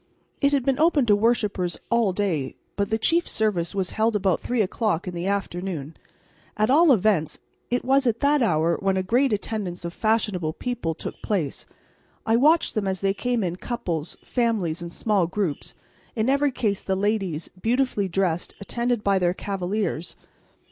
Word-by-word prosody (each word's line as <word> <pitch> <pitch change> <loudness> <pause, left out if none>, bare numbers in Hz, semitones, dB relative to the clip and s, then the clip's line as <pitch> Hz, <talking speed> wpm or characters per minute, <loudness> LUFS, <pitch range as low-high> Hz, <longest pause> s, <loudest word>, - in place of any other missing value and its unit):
It 280 -1 +4
had 275 -3 +1
been 270 0 +1
open 310 -4 +4
to 210 -3 +5
worshippers 205 -5 +1
all 235 -4 +3
day, 180 -9 -1 0.2
but 200 0 -1
the 220 - +1
chief 335 +9 +2
service 200 -6 0
was 190 -2 -1
held 220 0 +1
about 190 -3 +1
three 240 -3 0
o'clock 195 -2 -1
in 180 - -4
the 175 +2 -3
afternoon; 180 -6 -3 0.6
at 215 +4 +2
all 320 +2 +6
events 205 - +2 0.3
it 245 +1 -1
was 270 0 +3
at 230 -1 +1
that 290 0 +3
hour 170 -6 +2
when 195 -1 +1
a 190 - 0
great 250 +7 +2
attendance 200 -4 -3
of 170 - -4
fashionable 210 -8 0
people 240 -10 -3
took - - -7
place. 180 -10 -2 0.6
I 225 - +3
watched 305 +7 +4
them 215 -3 -1
as 190 -1 -2
they 195 0 +2
came 240 +2 -1
in 175 -1 -2
couples, 175 -9 -3
families 210 -9 0
and 170 0 -6
small 200 -3 +1
groups, 175 -5 -3 0.4
in 225 +2 +1
every 280 0 +2
case 210 -6 -1
the 190 - -1
ladies, 195 -5 -1
beautifully 240 -4 +1
dressed, 175 -2 -1
attended 235 +2 -1
by 200 -1 +3
their 175 0 +1
cavaliers. 190 -4 -3
205 Hz, 175 wpm, -24 LUFS, 180-235 Hz, 0.6 s, all